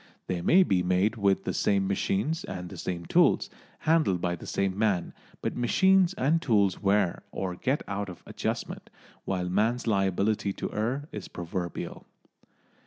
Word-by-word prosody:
They 90 Hz, -2 st, -2 dB
may 185 Hz, -, +6 dB
be 95 Hz, -, +2 dB
made 90 Hz, +5 st, +2 dB
with 100 Hz, -3 st, +2 dB
the -, -, -2 dB
same 100 Hz, -1 st, +2 dB
machines 105 Hz, -, 0 dB
and 90 Hz, -1 st, -6 dB
the -, -, -8 dB
same 85 Hz, -2 st, -4 dB
tools, -, -, +3 dB, 0.3 s
handled 155 Hz, -, +2 dB
by 90 Hz, 0 st, -1 dB
the 85 Hz, -, -11 dB
same 95 Hz, -1 st, 0 dB
man, 100 Hz, -5 st, 0 dB, 0.3 s
but -, -, -2 dB
machines 190 Hz, -, +3 dB
and 155 Hz, +5 st, +2 dB
tools 100 Hz, -, +2 dB
wear 100 Hz, -3 st, +2 dB
or 90 Hz, -2 st, -3 dB
get 130 Hz, +10 st, -1 dB
out 100 Hz, 0 st, -3 dB
of 90 Hz, -, -11 dB
adjustment, -, -, -4 dB, 0.4 s
while 90 Hz, -2 st, -1 dB
man's 110 Hz, +6 st, +1 dB
liability 100 Hz, 0 st, +1 dB
to -, -, -5 dB
err 125 Hz, +7 st, -2 dB
is 105 Hz, -3 st, -6 dB
proverbial. 85 Hz, 0 st, -5 dB
100 Hz, 160 wpm, -28 LUFS, 90-120 Hz, 0.4 s, may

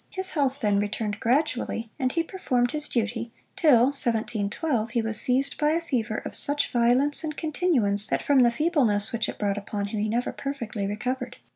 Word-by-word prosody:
His 375 Hz, 0 st, -1 dB
health 275 Hz, -3 st, 0 dB
then 205 Hz, -3 st, +2 dB
returned 205 Hz, 0 st, -3 dB
gradually, 245 Hz, -3 st, -1 dB
and 255 Hz, -1 st, 0 dB
he 330 Hz, -, 0 dB
performed 250 Hz, -9 st, -1 dB
his 300 Hz, -1 st, -4 dB
duty, 230 Hz, 0 st, -2 dB, 0.2 s
till 265 Hz, -5 st, +4 dB
(1712) 230 Hz, 0 st, 0 dB
he 235 Hz, -, -1 dB
was 225 Hz, 0 st, 0 dB
seized 265 Hz, +2 st, +1 dB
by 300 Hz, +1 st, +2 dB
a 335 Hz, -, 0 dB
fever 230 Hz, -8 st, -2 dB
of -, -, -6 dB
such 290 Hz, 0 st, +1 dB
violence 250 Hz, +6 st, +3 dB
and 305 Hz, -1 st, -4 dB
continuance, 265 Hz, -, +1 dB
that -, -, -1 dB
from 285 Hz, -2 st, +3 dB
the 240 Hz, -, +5 dB
feebleness 240 Hz, -, +1 dB
which 230 Hz, -1 st, -1 dB
it -, -, -6 dB
brought 205 Hz, -1 st, -1 dB
upon 200 Hz, 0 st, -4 dB
him, 215 Hz, 0 st, -3 dB
he 215 Hz, +1 st, -1 dB
never 240 Hz, +3 st, -1 dB
perfectly 235 Hz, -8 st, -4 dB
recovered. 250 Hz, +5 st, -4 dB
245 Hz, 185 wpm, -25 LUFS, 215-285 Hz, 0.2 s, the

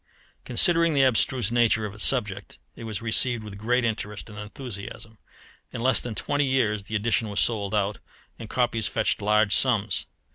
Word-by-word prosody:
Considering 170 Hz, -3 st, +3 dB
the 135 Hz, -, +4 dB
abstruse 125 Hz, -2 st, +1 dB
nature 115 Hz, -2 st, +2 dB
of 100 Hz, -, -6 dB
its 105 Hz, -, -1 dB
subject, 105 Hz, -7 st, +1 dB, 0.2 s
it 115 Hz, -, -9 dB
was 110 Hz, 0 st, -5 dB
received 115 Hz, 0 st, +1 dB
with 100 Hz, -2 st, -9 dB
great 120 Hz, +3 st, 0 dB
interest 105 Hz, -2 st, -4 dB
and 105 Hz, -, -10 dB
enthusiasm. 110 Hz, -1 st, -7 dB, 0.5 s
In -, -, -6 dB
less 130 Hz, +1 st, +4 dB
than 120 Hz, -3 st, -6 dB
twenty 145 Hz, +8 st, 0 dB
years 110 Hz, -7 st, 0 dB
the 110 Hz, -, -5 dB
edition 110 Hz, 0 st, 0 dB
was 100 Hz, -, -2 dB
sold 105 Hz, -3 st, 0 dB
out, 100 Hz, -1 st, -1 dB, 0.4 s
and 115 Hz, -2 st, -9 dB
copies 120 Hz, -3 st, 0 dB
fetched 110 Hz, -1 st, -1 dB
large 105 Hz, 0 st, +2 dB
sums. 105 Hz, -, +1 dB
110 Hz, 175 wpm, -25 LUFS, 105-125 Hz, 0.5 s, the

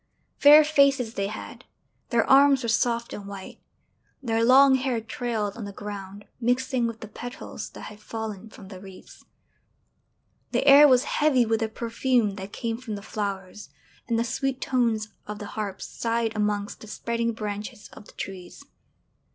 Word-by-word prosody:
Fair 300 Hz, +2 st, +9 dB
faces 280 Hz, -6 st, +3 dB
they 195 Hz, -2 st, -2 dB
had; 215 Hz, +2 st, -8 dB, 0.5 s
their 235 Hz, -3 st, +2 dB
arms 275 Hz, -1 st, +6 dB
were 235 Hz, -, -1 dB
soft 235 Hz, +1 st, 0 dB
and 200 Hz, -1 st, -7 dB
white; 200 Hz, -1 st, -9 dB, 0.6 s
their 225 Hz, -2 st, +1 dB
long 265 Hz, +3 st, +7 dB
hair 260 Hz, -2 st, 0 dB
trailed 225 Hz, -2 st, -3 dB
on 235 Hz, -, -7 dB
the 200 Hz, -, -6 dB
ground 200 Hz, 0 st, -8 dB
mixing 250 Hz, 0 st, 0 dB
with 230 Hz, -1 st, -7 dB
the 220 Hz, -, -7 dB
petals 245 Hz, +3 st, -8 dB
that -, -, -12 dB
had 210 Hz, -1 st, -10 dB
fallen 220 Hz, -1 st, -6 dB
from 200 Hz, -3 st, -13 dB
the 190 Hz, -2 st, -9 dB
wreaths. 190 Hz, -1 st, -14 dB, 1.3 s
The -, -, +1 dB
air 285 Hz, +1 st, +9 dB
was 255 Hz, -2 st, +4 dB
heavy 295 Hz, -5 st, +2 dB
with 225 Hz, 0 st, 0 dB
the 225 Hz, -, -1 dB
perfume 235 Hz, 0 st, 0 dB
that 190 Hz, +1 st, -7 dB
came 230 Hz, +1 st, -4 dB
from 230 Hz, -4 st, -6 dB
the 200 Hz, -, -8 dB
flowers, 200 Hz, -1 st, -5 dB, 0.4 s
and 230 Hz, -1 st, 0 dB
the 230 Hz, -, +2 dB
sweet 260 Hz, +2 st, -2 dB
tones 230 Hz, -5 st, 0 dB, 0.2 s
of 210 Hz, 0 st, -5 dB
the 205 Hz, -, -7 dB
harps 210 Hz, -3 st, -4 dB
sighed 230 Hz, -1 st, -2 dB
amongst 210 Hz, -1 st, -1 dB
the 220 Hz, -, -10 dB
spreading 235 Hz, +2 st, -2 dB
branches 210 Hz, -1 st, -6 dB
of -, -, -13 dB
the -, -, -16 dB
trees. 190 Hz, +8 st, -8 dB
225 Hz, 165 wpm, -25 LUFS, 210-250 Hz, 1.3 s, Fair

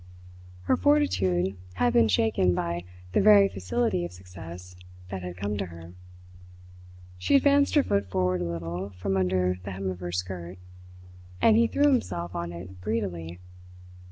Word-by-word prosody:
Her -, -, +2 dB
fortitude 95 Hz, 0 st, +2 dB, 0.2 s
had 120 Hz, +5 st, +2 dB
been 115 Hz, -1 st, +5 dB
shaken 95 Hz, -3 st, +2 dB
by 85 Hz, +1 st, -2 dB, 0.3 s
the -, -, +3 dB
very 200 Hz, -1 st, +7 dB
facility 95 Hz, -, -1 dB
of 85 Hz, -, -5 dB
success 90 Hz, 0 st, -11 dB, 0.3 s
that 95 Hz, -1 st, -5 dB
had 90 Hz, 0 st, -7 dB
come 100 Hz, +2 st, -2 dB
to 95 Hz, -, -2 dB
her. 85 Hz, 0 st, -11 dB, 1.3 s
She 90 Hz, -, +2 dB
advanced 280 Hz, +1 st, +4 dB
her 290 Hz, -, +5 dB
foot 100 Hz, -, 0 dB
forward 90 Hz, -1 st, 0 dB
a -, -, -1 dB
little 85 Hz, +3 st, -4 dB
from 95 Hz, +1 st, -1 dB
under 90 Hz, -1 st, +1 dB
the 100 Hz, -, -6 dB
hem 95 Hz, 0 st, -3 dB
of 90 Hz, -, -8 dB
her 90 Hz, -1 st, -5 dB
skirt; 90 Hz, 0 st, -5 dB, 0.8 s
and 220 Hz, -, +5 dB
he 230 Hz, +1 st, +4 dB
threw 285 Hz, -, 0 dB
himself 90 Hz, -, 0 dB
on 85 Hz, -1 st, -4 dB
it 90 Hz, +2 st, -10 dB
greedily. 90 Hz, -6 st, -3 dB
90 Hz, 155 wpm, -27 LUFS, 90-100 Hz, 1.3 s, very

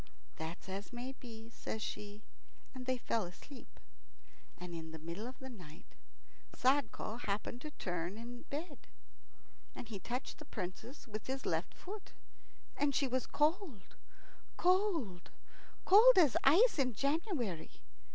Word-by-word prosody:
"That's 160 Hz, +4 st, -5 dB
as 195 Hz, +4 st, -5 dB
may 245 Hz, +2 st, -4 dB
be," 230 Hz, -3 st, -10 dB
says 220 Hz, -, -4 dB
she, 210 Hz, 0 st, -5 dB, 0.5 s
and 255 Hz, -1 st, -7 dB
they 255 Hz, 0 st, +2 dB
fell 230 Hz, -2 st, 0 dB
asleep. 245 Hz, +10 st, -12 dB, 0.8 s
And 180 Hz, -1 st, -7 dB
in 160 Hz, -1 st, -5 dB
the 160 Hz, -, -7 dB
middle 170 Hz, +8 st, -5 dB
of 255 Hz, -, -8 dB
the 265 Hz, -, -8 dB
night 180 Hz, -9 st, -12 dB, 0.6 s
Sadko 260 Hz, -4 st, +2 dB
happened 215 Hz, +3 st, -2 dB
to 305 Hz, -, -5 dB
turn 180 Hz, -, -3 dB
in 240 Hz, +2 st, -7 dB
bed, 295 Hz, +1 st, -5 dB, 0.9 s
and 235 Hz, -, -7 dB
he 205 Hz, -4 st, -4 dB
touched 245 Hz, +7 st, -4 dB
the 305 Hz, -, -9 dB
Princess 225 Hz, +6 st, -6 dB
with 215 Hz, -1 st, -6 dB
his 265 Hz, 0 st, -3 dB
left -, -, 0 dB
foot, 405 Hz, +2 st, -8 dB, 0.6 s
and 280 Hz, -1 st, +2 dB
she 275 Hz, -, +3 dB
was 255 Hz, 0 st, 0 dB
cold, 300 Hz, -, 0 dB, 0.6 s
cold, 350 Hz, -, +2 dB, 0.6 s
cold 445 Hz, +5 st, +9 dB
as 310 Hz, -9 st, +7 dB
ice 350 Hz, -, +7 dB
in 255 Hz, -3 st, +3 dB
January. 275 Hz, -, 0 dB
245 Hz, 140 wpm, -36 LUFS, 200-290 Hz, 0.9 s, cold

